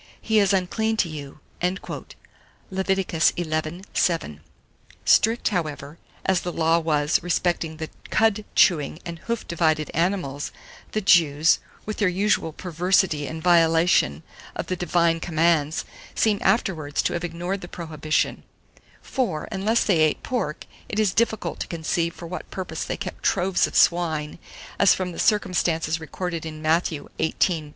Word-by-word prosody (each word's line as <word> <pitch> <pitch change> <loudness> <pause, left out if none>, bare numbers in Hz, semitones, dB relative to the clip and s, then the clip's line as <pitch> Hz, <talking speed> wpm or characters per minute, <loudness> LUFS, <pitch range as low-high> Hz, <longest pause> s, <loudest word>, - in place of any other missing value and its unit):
He 220 -1 +2
is 200 -1 +3
unclean 220 +4 0
to 185 - +2
you." 150 -1 -8 0.2
Lev. 190 +1 -6
xi. 175 -3 +1 0.4
7. 160 - 0 0.6
Strict, 225 +2 +4
however, 155 -5 -4 0.3
as 190 -2 +2
the 175 - -3
law 165 0 +2
was 150 -2 +1
respecting 175 -2 -1
the 160 0 -4 0.2
cud 220 -1 +2
chewing 155 -4 +3
and 170 -1 -6
hoof 235 +4 -4
divided 155 -2 +1
animals, 165 -5 -1 0.4
the 215 - 0
Jews, 160 -5 +4 0.3
with 215 - -4
their 205 - +2
usual 190 -2 +1
perversity 175 -2 +1
and 160 0 -6
violation 165 - +3 0.3
of - - -3
the 185 - -2
divine 170 -2 +1
commands, 160 -2 +1 0.3
seem 210 -2 +2
afterwards 160 -10 +1
to - - 0
have 175 0 -3
ignored 175 +3 -3
the 175 - -7
prohibition; 155 -3 -2 0.6
for, 200 -13 -2
unless 210 +4 +1
they 185 -6 +2
ate 155 -1 +2
pork, 220 -12 -3 0.2
it 205 - -4
is 205 -4 +2
difficult 220 -1 0
to - - -3
conceive 170 0 -1
for 170 - -9
what 180 +2 -7
purpose 180 -4 -5
they - - -3
kept 195 -3 -6
troves 185 -1 +2
of - - -10
swine, 160 -3 +2 0.4
as 200 - +6
from 185 -1 -3
the - - -8
circumstance 170 -6 +1
recorded 170 +1 -4
in 155 -1 -7
Matthew 155 -1 0
xviii. 160 -1 0
170 Hz, 145 wpm, -24 LUFS, 160-190 Hz, 0.6 s, as